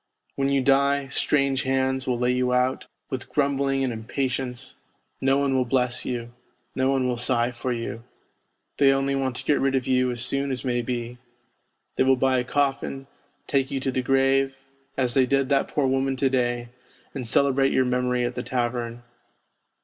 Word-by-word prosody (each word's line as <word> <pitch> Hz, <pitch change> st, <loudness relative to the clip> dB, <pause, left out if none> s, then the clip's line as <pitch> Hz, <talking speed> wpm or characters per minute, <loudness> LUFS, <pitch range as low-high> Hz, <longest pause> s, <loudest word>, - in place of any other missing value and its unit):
When 135 Hz, 0 st, 0 dB
you 140 Hz, -1 st, +2 dB
die, 140 Hz, 0 st, +2 dB
strange 140 Hz, -2 st, +1 dB
hands 130 Hz, 0 st, 0 dB
will 125 Hz, -1 st, +1 dB
lay 125 Hz, +1 st, +1 dB
you 125 Hz, 0 st, +1 dB
out, 125 Hz, +1 st, 0 dB, 0.2 s
with 130 Hz, -1 st, -4 dB
grumbling 140 Hz, -1 st, +1 dB
and 125 Hz, -2 st, -1 dB
impatience; 125 Hz, +2 st, -3 dB, 0.5 s
no 135 Hz, +1 st, +3 dB
one 140 Hz, -1 st, +1 dB
will 130 Hz, -, +3 dB
bless 125 Hz, -1 st, 0 dB
you, 120 Hz, -1 st, -4 dB, 0.4 s
no 130 Hz, 0 st, +1 dB
one 135 Hz, -2 st, +1 dB
will 125 Hz, -1 st, -1 dB
sigh 120 Hz, 0 st, +1 dB
for 125 Hz, +1 st, -4 dB
you, 115 Hz, -1 st, -4 dB, 0.8 s
they 140 Hz, -1 st, +6 dB
only 135 Hz, 0 st, +1 dB
want 135 Hz, -2 st, -1 dB
to -, -, -5 dB
get 145 Hz, -, +2 dB
rid 135 Hz, 0 st, +1 dB
of 130 Hz, -2 st, 0 dB
you 130 Hz, -1 st, +2 dB
as 120 Hz, -1 st, +1 dB
soon 140 Hz, +2 st, 0 dB
as 130 Hz, 0 st, -4 dB
may 120 Hz, -1 st, 0 dB
be; 120 Hz, 0 st, -4 dB, 0.8 s
they -, -, +4 dB
will 130 Hz, 0 st, +4 dB
buy 130 Hz, 0 st, +2 dB
a -, -, -1 dB
coffin, 135 Hz, 0 st, -1 dB, 0.4 s
take 135 Hz, -1 st, 0 dB
you 140 Hz, -2 st, -2 dB
to 135 Hz, 0 st, -1 dB
the 130 Hz, -, -1 dB
grave 135 Hz, +1 st, +2 dB, 0.4 s
as 125 Hz, -2 st, +1 dB
they 130 Hz, -2 st, +3 dB
did 135 Hz, 0 st, +1 dB
that 140 Hz, -1 st, +2 dB
poor 145 Hz, -, 0 dB
woman 135 Hz, 0 st, +1 dB
to 130 Hz, 0 st, +1 dB
day, 120 Hz, -2 st, 0 dB, 0.4 s
and 130 Hz, -4 st, -5 dB
celebrate 135 Hz, +2 st, +3 dB
your 130 Hz, -, +2 dB
memory 125 Hz, 0 st, 0 dB
at 120 Hz, -, -2 dB
the 125 Hz, -, -4 dB
tavern. 120 Hz, -1 st, -3 dB
130 Hz, 190 wpm, -25 LUFS, 125-135 Hz, 0.8 s, they